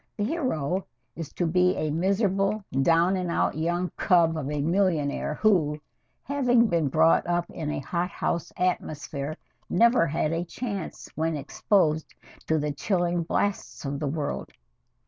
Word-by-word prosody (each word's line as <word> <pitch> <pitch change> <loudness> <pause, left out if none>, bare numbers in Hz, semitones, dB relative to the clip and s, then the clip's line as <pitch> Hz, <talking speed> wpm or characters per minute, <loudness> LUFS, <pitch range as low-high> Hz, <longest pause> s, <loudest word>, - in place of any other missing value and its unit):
The 205 - 0
hero 195 - -1 0.3
is 165 -3 -6
to 175 - -1
be 180 +3 +3
a 155 -1 -1
miserable, 195 +4 +1 0.2
down 170 +5 +4
and 180 -2 -2
out - - +1
young 175 +3 -1
cub 170 -3 +3
of 145 -3 -3
a 150 0 -2
millionaire 165 -4 +1
who, 160 -8 +2 0.4
having 250 -4 +3
been 170 -8 +1
brought 160 +5 +3
up 175 0 0
in 155 -2 -4
a - - -2
hot 170 +6 -2
house 170 -2 -2
atmosphere, 155 -4 -2 0.3
never 235 -1 +4
had 155 +1 0
a 165 +1 -1
chance 200 +3 -5
when 160 0 -1
exposed 155 +2 0 0.3
to 160 - +2
the 150 -1 -1
chilling 175 +2 0
blasts 195 0 -2
of 140 0 -3
the 150 - -2
world. 145 0 -3
170 Hz, 150 wpm, -26 LUFS, 155-190 Hz, 0.4 s, down